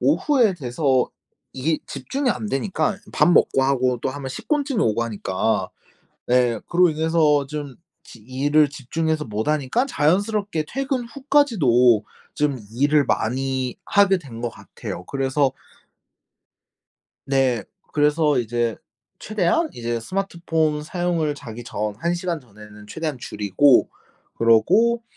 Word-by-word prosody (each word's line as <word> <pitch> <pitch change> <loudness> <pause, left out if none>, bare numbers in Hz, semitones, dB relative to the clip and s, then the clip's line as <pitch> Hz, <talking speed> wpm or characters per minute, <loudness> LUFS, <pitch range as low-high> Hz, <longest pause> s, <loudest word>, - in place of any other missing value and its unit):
오후에 250 -10 +3
돼서 130 -3 0 0.4
이게 155 +4 -1
집중이 250 - -2
안 215 - -3
되니까 190 +5 -1 0.2
밥 175 - +4
먹고 135 -5 +4
하고 130 -2 +1
또 - - -1
하면 135 0 -5
식곤증이 285 - -1
오고 115 +1 +1
하니까. 110 -1 -1 0.6
네 120 -3 +2
그로 180 0 +4
인해서 155 -2 +2
좀 145 -2 -6 0.3
지 115 - -13
일을 140 +6 +2
집중해서 155 +3 -2
못 110 +1 -3
하니까 155 - +1
자연스럽게 195 - 0
퇴근 270 -2 -2
후까지도 195 - +3 0.3
좀 145 -4 0 0.2
일을 145 +3 +3
많이 130 +2 -1
하게 200 -2 +3
된 120 -8 -10
것 120 - -1
같아요. 90 - -8
그래서 135 0 0 1.8
네. 130 -5 +1 0.3
그래서 150 -1 +2
이제 120 -1 -1 0.4
최대한 215 - 0
이제 120 0 -3
스마트폰 165 - -1
사용을 165 -2 -1
자기 120 -4 -9
전 105 -2 -3
1 170 +7 0
시간 175 -2 -3
전에는 105 -2 -15
최대한 155 +2 -4
줄이고 120 +6 +3 0.5
그러고 210 - +3
145 Hz, 260 characters per minute, -22 LUFS, 125-175 Hz, 1.8 s, 밥